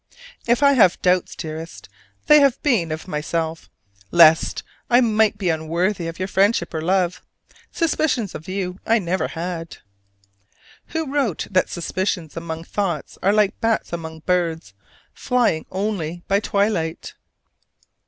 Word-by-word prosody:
If 240 +4 +2
I 280 0 +6
have 205 -9 +5
had - - -21
doubts, 180 0 +2
dearest, 160 0 -7 0.4
they 300 -2 +7
have 275 -3 +3
been 215 - +1
of 155 +3 -5
myself, 160 0 -3 0.4
lest 165 -2 +5 0.3
I 245 -1 +6
might 220 -3 +2
be 190 -3 -1
unworthy 170 +3 -1
of 165 - -6
your 185 - -3
friendship 195 -2 +1
or 160 - -2
love. 180 +1 0 0.5
Suspicions 300 - 0
of 155 - -9
you 185 -1 -4
I 230 - +3
never 185 -2 -1
had. 165 -1 -5 1.1
Who 320 -4 -4
wrote 265 - 0
that 185 -1 +2
suspicions 175 -2 -3
among 165 -1 -5
thoughts 175 -5 -3
are 195 - +3
like 210 0 +1
bats 225 -5 0
among 160 -1 -6
birds, 165 - -1 0.4
flying 240 -11 0
only 185 -4 -3
by 200 +1 +3
twilight? 200 -6 -1
185 Hz, 140 wpm, -21 LUFS, 165-215 Hz, 1.1 s, they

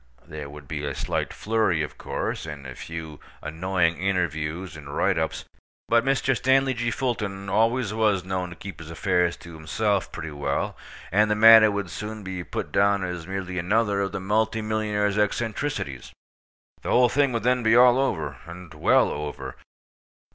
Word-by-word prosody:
There 75 -3 -7
would 75 -1 -11
be 75 0 -4
a 70 -2 -3
slight - - -2
flurry, 105 -7 0
of 75 - -6
course, - - -4
and 75 -3 -8
a 65 - -7
few 80 +1 -8 0.2
annoying 85 +2 0
interviews 85 -2 -2
and 75 -2 -8
write 95 -4 +2
ups; 80 - -3 0.4
but 115 0 +4
Mr. 135 -1 +1
Stanley 135 +1 +3
G. 120 -1 -1
Fulton 105 -6 -3
always 115 +1 +1
was 105 -4 +1
known 95 -1 -2
to 85 - -10
keep 95 +2 -9
his 80 -1 -10
affairs 90 0 +1
to 85 - -12
himself 95 +6 -1
pretty 80 -1 -6
well, 70 -1 -2 0.4
and 105 +3 +3
the 105 - +2
matter 110 0 +9
would 100 -4 -3
soon 105 +6 -6
be 95 -2 -5
put - - -5
down 100 -1 +3
as 90 -2 -5
merely 95 -1 -4
another 100 +2 +1
of 95 -1 -1
the - - -4
multi 110 +3 0
millionaire's 105 -1 0
eccentricities. 105 - -2 0.7
The - - -5
whole 125 0 +5
thing 140 +2 +2
would 115 - -1
then 125 +1 +2
be 110 0 +4
all 125 +1 +6
over, 135 - -1
and 85 -2 -10
well 75 - +3
over. 70 -3 -5
95 Hz, 175 wpm, -25 LUFS, 80-110 Hz, 0.7 s, matter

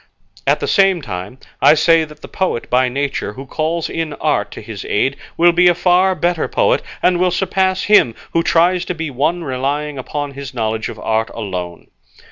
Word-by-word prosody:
At - - +3
the - - -1
same 195 -4 +3
time, 100 +2 -6 0.2
I - - +7
say 165 +1 +4
that 150 0 -16
the - - -7
poet 185 -11 -2
by 125 0 +3
nature 135 -5 -3
who 135 +5 -9
calls 160 +4 -2
in 160 -2 -3
art 125 -11 0
to - - -8
his 105 -2 -8
aid 135 +6 0 0.2
will 175 +1 +6
be 175 +1 +4
a 175 - +5
far 185 +2 +3
better 175 -2 0
poet, - - +2 0.2
and 180 -1 +3
will 180 0 +3
surpass 190 +1 0
him 165 - +4 0.2
who 165 - +3
tries 175 +2 +2
to 180 - -3
be 160 -2 -4
one 155 +7 0
relying 140 +1 -2
upon 145 +2 -4
his 135 -1 -8
knowledge 110 -1 -2
of - - -8
art 110 +1 -1
alone. 90 -6 -6
150 Hz, 195 wpm, -17 LUFS, 125-175 Hz, 0.2 s, I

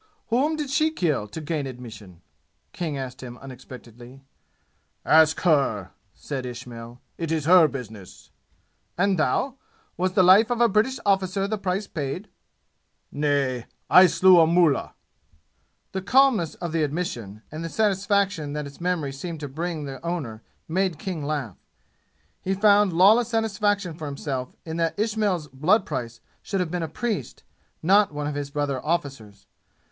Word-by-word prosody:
"Whom 275 +7 +2
did 295 -3 -4
she 310 +3 +3
kill 155 - -1
to 135 - -7
gain 155 -2 -3
admission?" 110 -8 -11 0.5
King 160 -5 -3
asked 130 -1 -6
him 125 -1 -9
unexpectedly. 125 -1 -12 0.8
"Ask 160 0 +5
her!" 135 - +1 0.2
said 135 -3 -5
Ismail. 120 -1 -8 0.2
"It 165 -2 -3
is 160 -3 -1
her 175 -1 +7
business." 110 -9 -10 0.7
"And 190 0 +2
thou? 265 - 0 0.4
Was 185 0 0
the 190 -2 +4
life 195 +6 +6
of 245 -1 -1
a 240 - +5
British 230 +5 +1
officer 195 0 +1
the 215 0 -3
price 190 +1 -2
paid?" 155 +5 -5 0.8
"Nay. 140 -4 0 0.2
I 185 +1 +9
slew 185 0 +6
a 160 - +6
mullah." 170 -3 +2 1.0
The 190 - -3
calmness 245 - +3
of 175 -2 -5
the 165 0 0
admission, 130 - -4
and 155 +2 -6
the 165 - -4
satisfaction 200 -6 0
that 150 0 -3
its 140 +3 -12
memory 170 -6 -1
seemed 160 +4 -6
to 145 - -4
bring 160 +3 -4
the 135 0 -8
owner 145 -11 -4 0.3
made 185 0 0
King 185 -7 -5
laugh. 140 -9 -3 0.8
He 190 +1 -1
found 205 0 +4
lawless 205 +7 +5
satisfaction 205 -5 0
for 155 -1 -7
himself 140 -2 -5
in 160 0 -5
that 165 +1 -1
Ismail's 210 -6 0
blood 170 - +2
price 120 -5 -5 0.2
should 195 - -3
have 180 -3 -2
been 180 -1 -2
a 165 - -2
priest, 180 - -4 0.4
not 200 +3 +4
one 145 0 -4
of 150 - -2
his 145 -1 -4
brother 140 -2 -2
officers. 135 - -3
160 Hz, 155 wpm, -24 LUFS, 135-195 Hz, 1.0 s, I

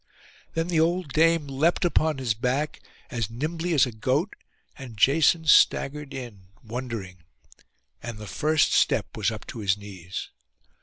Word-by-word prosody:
Then 165 +1 0
the 170 -3 +2
old 170 -2 0
dame 165 0 +3
leapt 145 +7 +1
upon 160 -3 +1
his 125 -4 0
back, 125 +7 -2 0.3
as 115 -4 -2
nimbly 160 +8 -2
as 140 - +5
a 125 - -5
goat; 130 - -1 0.4
and 125 -5 -10
Jason 160 +7 +4
staggered 150 -1 +3
in, 115 -9 -8 0.2
wondering; 115 -5 -6 0.8
and 115 -2 -6
the 105 - -8
first 155 +8 +1
step - - +2
was - - +1
up - - -7
to - - -8
his 100 -1 +1
knees. 95 -3 -8
135 Hz, 150 wpm, -25 LUFS, 110-160 Hz, 0.8 s, as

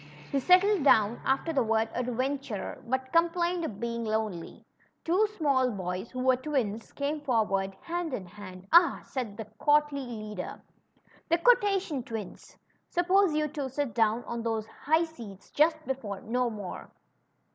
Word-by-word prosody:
He 275 - +2
settled 365 +4 +4
down 220 -4 +4
after 275 +5 0
the 270 -4 +3
Avord 225 0 0
adventurer^ 250 -2 -3
but 260 +1 -2
complained 345 +1 +2
of 220 -11 -5
being 235 0 -3
lonely. 215 -6 -3 0.4
Two 375 +6 +3
small 275 -5 +2
boys, 185 -1 -4
who 255 0 -4
Avere 255 -1 +3
twins, 235 -7 -2
came 290 +2 -2
forward 205 -8 0
hand 345 -1 -3
in 205 -7 -4
hand. 185 0 -11
^^Ah!" 340 0 +5
said 230 -7 -5
the 220 - -5
courtly 295 -1 +3
leader; 215 -6 -6 0.8
Quotation 395 - +3
tAAuns! 225 -5 -8 0.3
Suppose 365 -1 +3
you 305 0 +1
two 285 -2 -4
sit 270 -2 -2
down 225 +1 +2
on 235 0 -4
those 225 -2 -1
high 315 +8 +1
seats 230 - -10
just 315 +2 +3
before 255 -7 -3
710 240 +4 -1
'more. 195 -3 -7
255 Hz, 145 wpm, -29 LUFS, 220-305 Hz, 0.8 s, ^^Ah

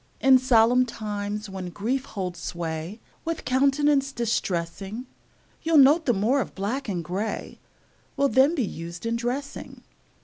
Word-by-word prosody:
In 265 -1 +6
solemn 250 -1 +4
times, 210 -2 -4
when 190 -2 -6
grief 245 +9 -2
holds 180 -4 -5
sway 170 +4 -5 0.2
With 330 -1 -4
countenance 275 +1 +2
distressing, 200 -1 -2 0.6
You'll 325 -1 +3
note 290 +4 +6
the 245 - +4
more 230 +7 +2
of - - -6
black 225 +7 -3
and 175 -4 -2
gray 195 +6 -4 0.6
Will 280 0 +3
then 270 +7 +4
be 260 -8 +1
used 170 +1 -7
in 230 0 0
dressing. 250 +4 -4
230 Hz, 140 wpm, -25 LUFS, 195-270 Hz, 0.6 s, In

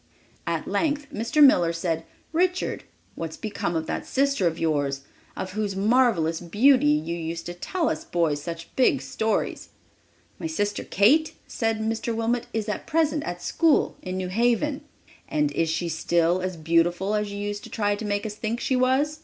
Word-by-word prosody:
At - - -2
length 295 -2 0
Mr. 235 +7 +3
Miller 175 -11 +6
said: 165 -1 -2 0.3
"Richard, 360 +2 0 0.3
what 165 - -4
has - - -10
become 200 -5 -3
of 160 -1 -1
that - - -3
sister 275 -8 +1
of 165 -1 -1
yours, 145 -4 0 0.4
of 185 - -4
whose 205 -1 -2
marvelous 200 -6 +2
beauty 215 - +4
you 155 +3 +1
used 165 0 -5
to 175 - -5
tell 325 - -2
us 155 - -2
boys 160 -4 0
such 165 +1 -7
big 140 - +3
stories?" 215 +12 -2 0.7
"My 330 - -3
sister 205 -10 -2
Kate," 285 - +3
said 225 -1 -1
Mr. 225 +1 -2
Wilmot, 230 +1 -1
"is 220 -1 -2
at 210 - -4
present 310 -1 +1
at 175 0 -5
school 325 -3 +2
in 185 0 -4
New 185 -1 -3
Haven." 240 +8 +1 0.5
"And 150 -1 0
is 165 +2 0
she 170 +2 -1
still 170 +2 +1
as 185 -1 -3
beautiful 170 +5 +1
as 210 -1 -1
you 200 - -5
used 205 0 -4
to - - -10
try 205 -2 0
to 205 - -7
make 205 0 -1
us 215 - -3
think 220 +2 -3
she 260 - 0
was?" 265 +4 +2
205 Hz, 180 wpm, -25 LUFS, 165-245 Hz, 0.7 s, Miller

